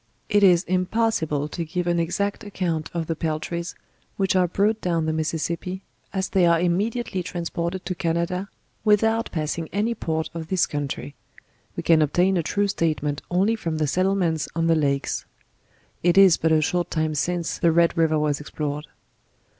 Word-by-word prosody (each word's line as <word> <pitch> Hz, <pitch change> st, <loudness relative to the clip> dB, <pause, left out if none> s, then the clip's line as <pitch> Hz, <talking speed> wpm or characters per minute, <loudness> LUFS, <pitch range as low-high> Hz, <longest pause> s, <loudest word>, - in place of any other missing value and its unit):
It 205 Hz, -1 st, +3 dB
is 180 Hz, -3 st, +6 dB
impossible 185 Hz, -6 st, 0 dB
to 170 Hz, -, -4 dB
give 175 Hz, +2 st, -3 dB
an 175 Hz, -1 st, +1 dB
exact 200 Hz, +6 st, -1 dB
account 175 Hz, -6 st, -2 dB
of 170 Hz, -1 st, -2 dB
the 165 Hz, -, -2 dB
Peltries, 165 Hz, +2 st, -3 dB, 0.4 s
which 190 Hz, -1 st, +1 dB
are 180 Hz, -1 st, +4 dB
brought 210 Hz, +5 st, +1 dB
down 170 Hz, -3 st, 0 dB
the 160 Hz, -, 0 dB
Mississippi, 165 Hz, +4 st, -3 dB, 0.3 s
as 190 Hz, -1 st, -2 dB
they 185 Hz, -3 st, +3 dB
are 170 Hz, -1 st, +4 dB
imme 180 Hz, +6 st, +1 dB
diately 230 Hz, -6 st, -3 dB
transported 170 Hz, +1 st, -4 dB
to 185 Hz, -, -2 dB
Canada, 170 Hz, +3 st, -1 dB, 0.3 s
without 225 Hz, +2 st, +2 dB
passing 160 Hz, 0 st, -3 dB
any 215 Hz, +4 st, 0 dB
port 160 Hz, -7 st, -3 dB
of 165 Hz, -1 st, -6 dB
this 185 Hz, 0 st, +2 dB
country: 145 Hz, -1 st, -4 dB, 0.6 s
we -, -, -4 dB
can 165 Hz, -2 st, +5 dB
obtain 175 Hz, +6 st, +2 dB
a 175 Hz, -, +2 dB
true 200 Hz, +5 st, 0 dB
statement 155 Hz, -6 st, -1 dB
only 195 Hz, +6 st, +2 dB
from 165 Hz, -7 st, -3 dB
the 155 Hz, -, +1 dB
settlements 180 Hz, 0 st, +1 dB
on 165 Hz, 0 st, +1 dB
the 165 Hz, -, +4 dB
Lakes. 140 Hz, -3 st, 0 dB, 0.8 s
It 175 Hz, +2 st, +3 dB
is 195 Hz, -4 st, +8 dB
but 160 Hz, -, 0 dB
a 155 Hz, -1 st, +4 dB
short 175 Hz, +2 st, 0 dB
time 155 Hz, -1 st, -1 dB
since 170 Hz, +3 st, -1 dB
the 170 Hz, -, +4 dB
Red 170 Hz, +1 st, +3 dB
river 160 Hz, -1 st, +2 dB
was 150 Hz, -1 st, 0 dB
explored. 150 Hz, 0 st, -4 dB
170 Hz, 175 wpm, -24 LUFS, 160-190 Hz, 0.8 s, is